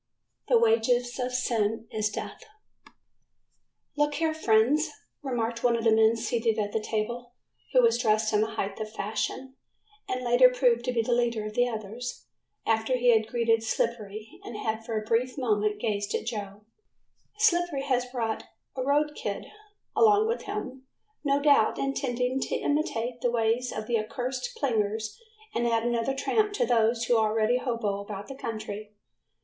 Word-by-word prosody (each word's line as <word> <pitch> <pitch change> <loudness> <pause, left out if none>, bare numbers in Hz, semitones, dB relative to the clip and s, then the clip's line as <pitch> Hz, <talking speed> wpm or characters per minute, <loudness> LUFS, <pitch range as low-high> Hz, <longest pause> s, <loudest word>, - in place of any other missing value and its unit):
"The 480 - +5
Wages 255 - +2
of 250 0 -1
Sin 225 -3 0
is 215 -1 0
Death." 335 - -7 1.5
"Look 295 0 +1
here, 320 +1 +1
friends," 290 +3 +3 0.3
remarked 235 -4 -2
one 240 -1 +4
of 230 - -2
the 225 - +4
men 220 +1 +5
seated 225 0 0
at 205 -1 -1
the - - +1
table, 235 +3 -3 0.4
who - - +5
was 460 - +4
dressed 215 -2 +2
in 210 - +4
the 220 +1 -2
height 195 0 -3
of 215 0 -5
fashion, 220 +5 -3 0.6
and 255 0 -2
later 245 +1 +6
proved 245 -2 +2
to 250 - 0
be 230 -2 +1
the 245 - -2
leader 235 -3 +1
of 215 - -5
the 245 +2 +2
others, 225 +2 -6 0.4
after 225 +3 +1
he 245 0 +3
had 220 0 +1
greeted 230 -1 +2
Slippery 220 -1 -3
and 230 - -7
had 220 +1 -2
for 225 -1 -3
a 215 - -9
brief 245 +4 0
moment 210 -4 0
gazed 205 -2 -1
at - - -3
Joe, 205 -3 -5 0.7
"Slippery 350 -9 +2
has 255 -2 0
brought 235 -3 -3 0.3
a 260 - -2
road 295 +3 +2
kid - - -4 0.5
along 430 -1 +5
with 465 +2 -1
him, 270 -11 -6 0.4
no 280 -1 +2
doubt 285 -7 +4
intending 260 -1 -1
to - - -2
imitate 245 -5 -1
the 245 - +2
ways 235 +1 +1
of 215 - -4
the 230 0 +1
accursed 255 - -4
plingers 220 - -1 0.4
and 240 0 0
add 230 -1 +1
another 240 +2 0
tramp 420 +9 +1
to 410 - +1
those 230 0 +2
who 235 0 +3
already 220 +2 +2
hobo 230 -6 -2
about 200 -1 -7
the 270 - -7
country." 215 -3 -6
235 Hz, 165 wpm, -27 LUFS, 220-260 Hz, 1.5 s, later